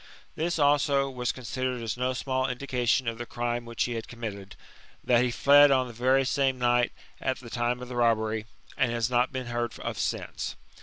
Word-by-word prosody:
This, 170 +2 -1
also, 145 -2 +3
was 125 -2 -1
considered 130 0 -3
as 110 -2 -2
no 125 +1 -1
small 130 0 -1
indication 125 -1 0
of 115 0 -2
the 120 - -4
crime 120 0 -2
which 115 -1 -1
he 120 - -2
had 115 -1 -5
committed, 100 -5 -7 0.5
that 120 0 +4
he 125 - +1
fled 145 +4 +6
on 130 -2 +3
the 120 - -9
very 130 +3 +2
same 135 -1 +1
night 120 -1 +2 0.3
at 130 - -1
the 120 -2 -11
time 125 +1 -1
of - - -8
the 125 - -7
robbery, 110 -2 +1 0.3
and 130 -5 +1
has 120 +1 -1
not 125 0 +2
been 130 -1 -4
heard 120 -1 -3
of - - -4
since. - - -3
125 Hz, 200 wpm, -28 LUFS, 120-130 Hz, 0.5 s, fled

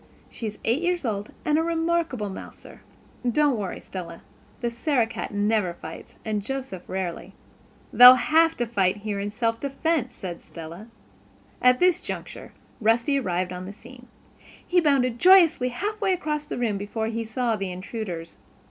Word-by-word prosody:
"She 230 - -5
is 210 - -6
eight 235 +8 +1
years 350 -3 0
old, 205 -2 -3
and 305 -1 +3
a - - +1
remarkable 325 - -1
mouser. - - -11 0.5
Don't 295 +1 +3
worry, 200 -4 -4
Stella. 170 -3 -8 0.4
The 240 -1 -1
Sarah 245 0 +1
cat 225 - -6
never 205 -3 +1
fights 160 -1 -10
and 215 -2 -1
Joseph 255 -4 -5
rarely." 185 -3 -4 0.6
"They'll 250 +1 +11
have 320 +7 +3
to 240 - 0
fight 200 -4 +1
here 205 -2 -2
in 200 +1 -2
self 230 +1 -1
defense," 275 -2 -1
said 175 -3 -7
Stella. 170 +5 -10 0.7
At 250 0 +5
this 360 0 +3
juncture - - -7 0.3
Rusty 235 +5 +2
arrived 180 -5 -2
on 180 +1 -6
the 200 - -7
scene. 245 +3 -15 0.6
He 355 0 +3
bounded 255 -6 +2
joyously 345 -8 +6
half 415 - -4
way 385 -2 +2
across 300 -4 -2
the - - -4
room 220 -5 -1
before 215 +2 -3
he 230 +1 -2
saw 230 +1 -1
the 195 -3 -4
intruders. 180 -3 -6
235 Hz, 165 wpm, -25 LUFS, 200-295 Hz, 0.7 s, They'll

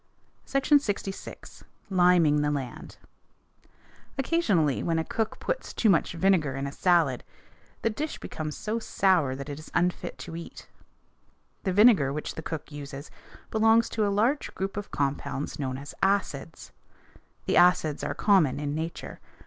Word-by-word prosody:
SECTION 275 +2 +3
LXVI. 200 -6 -6 0.3
LIMING 175 -5 +4
THE 150 - +1
LAND 135 -4 -5 1.2
Occasionally, 210 - +1
when 165 -1 0
a 160 - +1
cook 220 +6 -3
puts - - -3
too 220 - +4
much 170 - +1
vinegar 170 -6 +2
in 135 +1 -3
a 140 - -4
salad, 165 -7 +2 0.6
the 225 - +2
dish 300 +8 -4
becomes 155 -1 -6
so 220 +2 -2
sour 180 -11 +2
that 140 +1 -7
it 145 0 -6
is 155 - -12
unfit 175 +1 0
to 165 - -8
eat. 170 - -9 1.0
The 190 - +1
vinegar 200 - +5
which 150 +2 -4
the - - -6
cook 160 -1 -6
uses 145 0 -8 0.4
belongs 225 +1 +4
to 220 - -1
a - - +1
large 230 +9 0
group 195 +1 -3
of 205 0 -5
compounds 140 +1 -3
known 130 -2 -2
as 140 +1 -9
acids. 190 -6 -1 0.7
The - - +1
acids 175 -4 +4
are - - -2
common 180 -11 +3
in 145 -1 -2
nature. 160 +2 -5
170 Hz, 150 wpm, -27 LUFS, 145-205 Hz, 1.2 s, vinegar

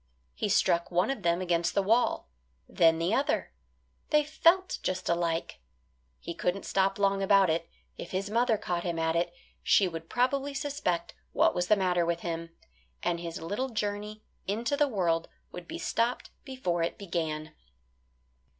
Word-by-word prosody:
He - - -2
struck 170 0 +2
one 180 +8 +2
of 270 - -4
them 170 0 +1
against 170 -2 0
the 200 - +3
wall; 225 +5 +2 0.4
then 165 -1 +4
the 170 +5 0
other, 275 +4 0 0.6
they 300 -1 +4
felt 335 +5 +2
just 185 0 -2
alike. 170 -1 -1 0.6
He 170 - -6
couldn't 180 +3 -2
stop 195 0 +1
long 195 -1 +2
about 195 -3 +5
it; 165 +1 -2 0.3
if 170 - -6
his 190 +2 -2
mother 230 +1 +2
caught 175 -4 -2
him 170 -1 -3
at 160 0 0
it, 170 +1 +1 0.3
she 195 - +4
would 165 -1 -7
probably 275 +3 0
suspect 275 - -2 0.2
what - - +4
was 180 0 -1
the 215 - +5
matter 180 -3 +1
with 170 0 -1
him, 165 -1 -4 0.5
and 170 -1 0
his 170 -1 -6
little 210 +10 -2
journey 210 -1 -3 0.2
into 230 +7 0
the 295 0 +3
world 170 -8 0 0.2
would 180 -1 -9
be - - -5
stopped 235 +2 -1
before 220 -11 -2
it 165 - -1
began. 160 -5 -3
185 Hz, 165 wpm, -29 LUFS, 170-220 Hz, 0.6 s, about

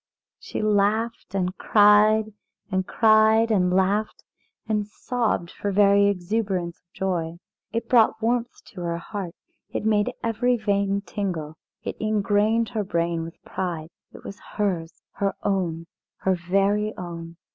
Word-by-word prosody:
She - - -5
laughed 215 +1 +1
and 185 -1 -1
cried, 215 +1 +5 0.4
and 185 0 0
cried 220 +1 +4
and 180 -4 +3
laughed 195 +3 +1 0.4
and 210 -2 0
sobbed 220 -5 -2
for 205 - -3
very 200 0 +5
exuberance 190 -2 -1
of 175 - -53
joy. 170 -3 -2 0.3
It 230 +1 -3
brought 225 -3 +4
warmth 235 +1 -1
to 185 - -7
her 170 -1 -2
heart, 185 0 -6 0.3
it - - -4
made 215 +2 +2
every 235 +2 +1
vein 200 -2 0
tingle, 180 -7 -4 0.3
it - - -5
ingrained 215 +1 +1
her 220 -3 -2
brain 170 -3 -1
with 165 0 -8
pride. 170 -4 -4 0.2
It - - -13
was 200 - -8
hers! 180 -6 -3
her 200 -1 -1
own! 175 -4 -1 0.4
her 190 - +2
very 195 +4 0
own! 170 -1 -7
200 Hz, 135 wpm, -24 LUFS, 180-215 Hz, 0.4 s, cried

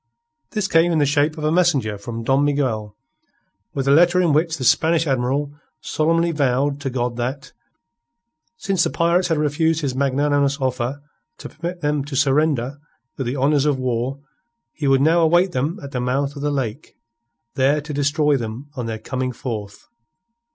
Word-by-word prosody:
This 210 -4 0
came 165 0 +3
in 165 - +1
the 145 - +3
shape 145 +2 +1
of 155 - -6
a 155 - +1
messenger 155 -11 +2
from 115 +3 -6
Don 135 +4 +2
Miguel 125 -8 -1 0.8
with 135 -1 -2
a - - +4
letter 175 +4 +5
in 170 -4 +3
which 160 +2 +1
the 130 - -5
Spanish 160 +5 +3
Admiral 135 +1 -1 0.3
solemnly 165 +2 +1
vowed 140 -1 0
to 135 - -2
God 120 -1 -2
that, 130 +3 -4 1.0
since 195 -6 0
the - - +1
pirates 170 +2 +1
had 165 -3 0
refused 155 +2 +1
his 140 -3 -2
magnanimous 140 +1 +1
offer 130 +1 -2 0.3
to - - -9
permit 175 +2 -6
them 150 -2 0
to 145 -1 -6
surrender 140 -1 +1 0.4
with 135 - -4
the 130 +4 -2
honours 145 +2 +2
of 145 -2 +1
war, 130 +1 -2 0.5
he 145 - -3
would 135 0 +4
now 165 +4 +4
await 175 +3 +3
them 155 +6 -2
at 140 - -8
the 125 - -2
mouth 135 +3 -1
of 140 - -7
the 145 - 0
lake 135 -1 -4 0.6
there 140 +2 +2
to 150 +1 -7
destroy 145 +1 +2
them 120 +3 -5
on 125 -3 -4
their 110 -1 -3
coming 130 +3 -3
forth. 110 -5 -7
140 Hz, 180 wpm, -21 LUFS, 130-155 Hz, 1.0 s, letter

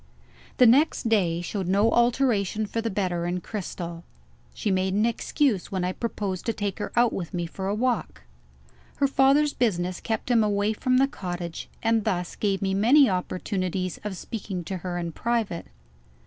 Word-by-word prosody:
The 250 - +7
next 250 0 +4
day 175 -6 +2
showed 185 +1 -3
no 200 +4 +3
alteration 235 -4 +2
for 225 +3 -3
the 230 - -2
better, 180 -4 -1
in 180 +1 -1
Cristel. 175 -4 -6 0.5
She 210 - -2
made 190 0 +1
an 210 +2 +3
excuse 235 -2 0
when 190 -2 -1
I 180 - 0
proposed 200 -3 -3
to 230 - +1
take 205 -1 -3
her - - -4
out 240 -1 +4
with 180 -1 -4
me 175 -1 -1
for 190 +3 -5
a 200 - 0
walk. 245 +2 -1 0.7
Her 280 - +2
father's 275 +2 +4
business 180 -7 0
kept 225 +2 -2
him 230 -2 +5
away 205 +1 +1
from 255 +3 +1
the 270 +1 +4
cottage, 175 -8 -6
and 225 -1 +2
thus 180 -2 -2
gave 200 -2 -1
me 190 0 0
many 245 +6 +5
opportunities 185 -1 -2
of 205 -3 -4
speaking 195 -3 -5
to 190 +3 -4
her 180 0 -4
in 170 -1 -3
private. 225 -3 -2
200 Hz, 175 wpm, -26 LUFS, 180-230 Hz, 0.7 s, The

